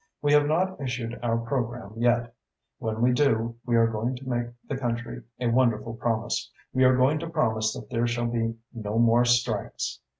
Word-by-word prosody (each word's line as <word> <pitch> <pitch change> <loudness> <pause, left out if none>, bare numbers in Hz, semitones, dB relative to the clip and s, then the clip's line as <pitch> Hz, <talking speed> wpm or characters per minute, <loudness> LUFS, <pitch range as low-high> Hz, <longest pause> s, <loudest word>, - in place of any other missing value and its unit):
We 145 0 +2
have 145 0 +5
not 185 +3 0
issued 120 -2 -3
our 115 -1 +1
programme 120 -3 -3
yet. 120 0 +1 0.5
When 110 +1 -2
we 125 - +5
do, 115 -4 +1
we 120 - +2
are 115 0 +5
going 115 +3 -1
to 130 +1 -10
make 120 -1 -1 0.2
the 135 - -2
country 120 -2 -3 0.2
a 125 - -2
wonderful 115 -2 +2
promise. 115 -1 -2 0.2
We 130 - +3
are 130 0 +5
going 135 +4 +3
to 165 +1 -5
promise 110 -9 +1
that - - -9
there 120 -1 +1
shall 120 0 -1
be 115 -1 -1 0.2
no 110 -2 -3
more 120 +1 +5
strikes. 120 -3 0
120 Hz, 190 wpm, -26 LUFS, 115-130 Hz, 0.5 s, have